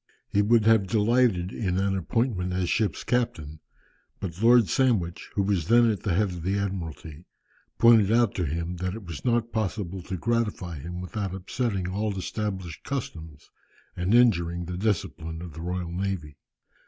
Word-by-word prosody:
He 100 - +2
would 110 +1 +3
have 110 -3 +4
delighted 105 -3 +2
in 95 -5 -2
an 95 0 +1
appointment 95 -1 -1
as 90 -1 -1
ship's 105 -9 0
captain, 80 -11 -1 0.6
but 90 0 -6
Lord 120 -1 +6
Sandwich, 110 -11 0
who 100 - +2
was 95 -5 0
then 120 0 +5
at 105 - -4
the 100 - 0
head 105 +1 +2
of 90 -1 -6
the 95 +4 0
Admiralty, 85 -5 -5 0.5
pointed 115 -3 +6
out 115 -2 +3
to 90 - -1
him, 85 +4 -3
that 90 +2 -3
it 110 - -8
was 85 -4 -7
not 120 -1 +1
possible 100 -4 -2
to 95 +2 -5
gratify 105 -6 -1
him 90 +4 -6
without 95 0 -4
upsetting 95 0 -2
all 100 +2 -2
established 95 -3 -4
customs, 80 - -6 0.4
and 90 +5 +1
injuring 85 -8 +3
the 90 +1 -5
discipline 90 -5 -2
of 85 -2 -8
the 80 - -8
Royal 90 0 -3
Navy. 90 -5 -3
95 Hz, 165 wpm, -26 LUFS, 85-110 Hz, 0.6 s, Lord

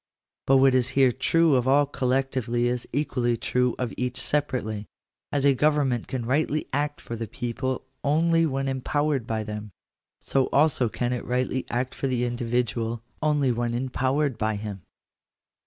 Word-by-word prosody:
But 135 - +6
what 135 0 +5
is 130 -1 +2
here 135 -2 +6
true 165 +5 +3
of 125 -1 +2
all 145 +2 +5
collectively 130 -3 0
is 120 0 -1
equally 125 -4 0
true 125 +1 0
of 125 -2 -3
each 125 0 -2
separately. 125 -8 -1 0.4
As 140 -1 +1
a 140 - +6
government 135 -3 +1
can 125 -3 -3
rightly 150 +4 0
act 145 +1 -1
for 115 - -6
the 115 0 -4
people, 125 +4 -3 0.2
only 165 +3 +3
when 135 -1 -2
empowered 135 0 -1
by 110 -1 -1
them, 105 0 -6 0.5
so 135 -1 +1
also 140 -5 +3
can 120 +2 -2
it 125 - -3
rightly 125 +1 -1
act 125 +2 -2
for 135 - -2
the 125 -2 0
individual, 120 -1 -1 0.2
only 150 -4 +2
when 120 0 -1
empowered 130 +2 0
by 110 0 0
him. 100 -2 -6
130 Hz, 160 wpm, -26 LUFS, 120-140 Hz, 0.5 s, But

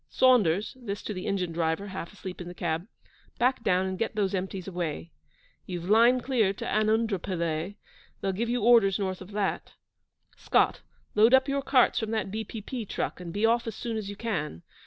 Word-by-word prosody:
Saunders' 215 -7 +3
(this 205 -3 -5
to 210 - -4
the 185 -2 -5
engine 185 -3 -1
driver, 165 +3 -1
half 190 -3 -6
asleep 190 -3 -8
in 175 - -7
the 175 - -8
cab), 170 +1 -2 0.5
'back 250 0 +1
down 185 0 +2
and 190 -1 -3
get 225 - -1
those 200 -2 0
empties 190 0 -3
away.' 170 -3 -4 0.6
You've 175 -1 -5
'line 240 +3 +6
clear' 230 -7 +2
to - - -7
Anundrapillay; 195 -6 0 0.4
they'll 195 - -1
give 225 +5 -2
you 240 -2 0
orders 225 -5 +5
north 190 -2 -3
of 185 - -10
that. 205 -2 -2 0.6
Scott, - - +2 0.3
load 225 +4 +6
up 265 +1 +3
your 275 0 0
carts 265 -2 +3
from 220 - -3
that 215 -4 -2
B.P.P. 220 +2 -5
truck, - - -3
and 175 -2 -7
be 205 +5 +1
off 235 +1 +2
as 225 - -4
soon 230 -2 -4
as 215 -2 -4
you 205 - -6
can. 160 - -3
200 Hz, 190 wpm, -28 LUFS, 180-225 Hz, 0.6 s, line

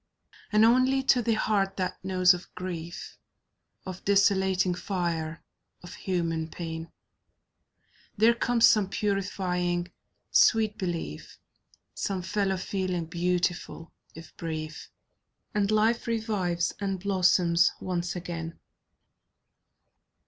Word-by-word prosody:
And 215 +1 +5
only 255 +3 +4
to 255 -2 +4
the 230 -1 +1
heart 195 -3 0
that 185 -1 -3
knows 185 -1 +4
of 180 0 -7
grief, 170 -2 -6 0.7
Of 185 -1 -7
desolating 190 -2 +3
fire, 170 -4 -3 0.4
of 175 - -9
human 165 -4 -2
pain, 165 0 -6 1.3
There 225 +3 +5
comes 235 0 +3
some 205 -3 +4
purifying 180 -3 -1 0.4
sweet 220 -2 +4
belief, 170 - -5 0.6
Some 190 -2 -3
fellow 195 +1 0
feeling 185 -2 -2
beautiful, 175 0 -2 0.2
if 165 +1 -12
brief. 160 -1 -5 0.6
And 205 -1 +1
life 220 +3 +2
revives, 205 -7 -1
and 195 -2 -2
blossoms 180 -3 +3
once 180 -1 -3
again. 165 -2 -5
185 Hz, 100 wpm, -28 LUFS, 175-205 Hz, 1.3 s, And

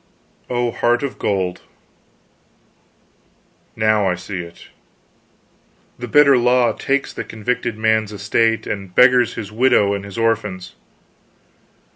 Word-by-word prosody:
"Oh, 120 -1 -1
heart 120 +3 0
of 140 - -5
gold, 95 -3 -2 2.1
now 110 -2 +2
I 90 - 0
see 95 +1 -7
it! 85 -1 -11 1.3
The 120 - -5
bitter 140 +1 +5
law 125 0 +2
takes 140 +1 -2
the - - -5
convicted 115 +1 -3
man's 110 -1 +1
estate 110 +3 0
and 95 -3 -6
beggars 125 0 +4
his 105 -3 -7
widow 110 -3 +2
and 100 -1 -4
his 100 +1 -10
orphans. 105 -5 -2
110 Hz, 115 wpm, -19 LUFS, 100-120 Hz, 2.1 s, bitter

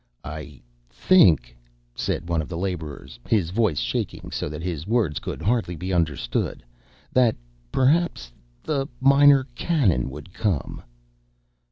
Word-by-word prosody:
"I 75 -2 -8 0.3
think," 65 - +4 0.4
said 85 - -3
one 85 -2 0
of 75 - -8
the 85 - -5
laborers, 80 -7 -5
his 95 -7 +2
voice 105 -7 +1
shaking - - -3
so - - -3
that 75 +2 -6
his 85 -2 -4
words 105 - +1
could - - -6
hardly 110 -5 0
be 90 +4 -4
understood, 80 -5 -1 0.5
"that—perhaps—the 65 - -1
Minor 140 +1 +6
Canon—would 90 - 0
come." 95 -10 -2
85 Hz, 115 wpm, -24 LUFS, 70-115 Hz, 0.5 s, Minor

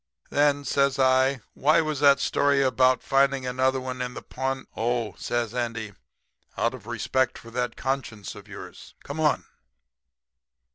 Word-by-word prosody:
"'Then,' 145 0 +2
says 140 +1 +2
I, 130 0 +3
'why 155 +4 +3
was 155 -3 -2
that 140 -1 +6
story 140 -1 +2
about 130 0 +3
finding 135 -1 +2
another 130 +1 +1
one 130 0 -5
in 125 0 -4
the - - -7
pawn 130 0 -3
' - - -36
"'Oh,' 115 -3 -1
says 120 -2 -2
Andy, 115 -4 -3 0.6
'out 115 +2 +1
of 115 -4 -11
respect 120 +2 0
for 115 - -12
that 125 +1 -2
conscience 130 -7 -3
of - - -13
yours. - - -11
Come 140 +3 -6
on.'" 150 -2 +2
130 Hz, 155 wpm, -26 LUFS, 120-140 Hz, 0.6 s, that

